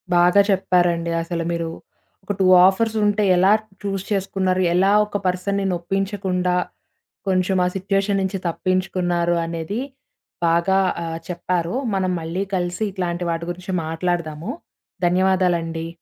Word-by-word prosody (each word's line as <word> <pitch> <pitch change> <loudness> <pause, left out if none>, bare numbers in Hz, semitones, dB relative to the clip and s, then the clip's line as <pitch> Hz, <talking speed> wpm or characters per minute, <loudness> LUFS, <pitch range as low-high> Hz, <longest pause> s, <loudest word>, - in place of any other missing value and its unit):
బాగా 175 +3 +5
చెప్పారండి. 175 -3 +1
అసలు, 170 0 -3
మీరు. 170 -1 -2 0.5
ఒక 195 - -4
2 190 - +3 0.2
ఆఫర్స్ 220 +3 +1
ఉంటే 205 0 +2
ఎలా 190 +2 +5 0.3
చూస్ 195 -2 -2
చేసుకున్నారు? 190 -1 0
ఎలా 190 +2 +3
ఒక 205 -1 -3
పర్సన్‌‌‌‌ని 195 +2 0
నొప్పించకుండా, 185 0 -1 0.7
కొంచెం 185 0 +1
ఆ - - +2
సిట్యుయేషన్ 195 +1 0
నుంచి 190 +1 -1
తప్పించుకున్నారు 175 -1 0
అనేది 165 +6 -4 0.7
బాగా 170 +3 +3 0.2
ఆహ్, 165 0 -4
చెప్పారు. 175 +1 -2 0.2
మనం 185 -1 0
మళ్ళీ 170 +4 -2
కలిసి 180 +3 -2
ఇట్లాంటి 180 -2 -3
వాటి 165 0 -3
గురించి 180 +2 -7
మాట్లాడదాము. 165 +2 -2 0.6
ధన్యవాదాలండి. 175 -3 +1
180 Hz, 120 wpm, -21 LUFS, 170-195 Hz, 0.7 s, బాగా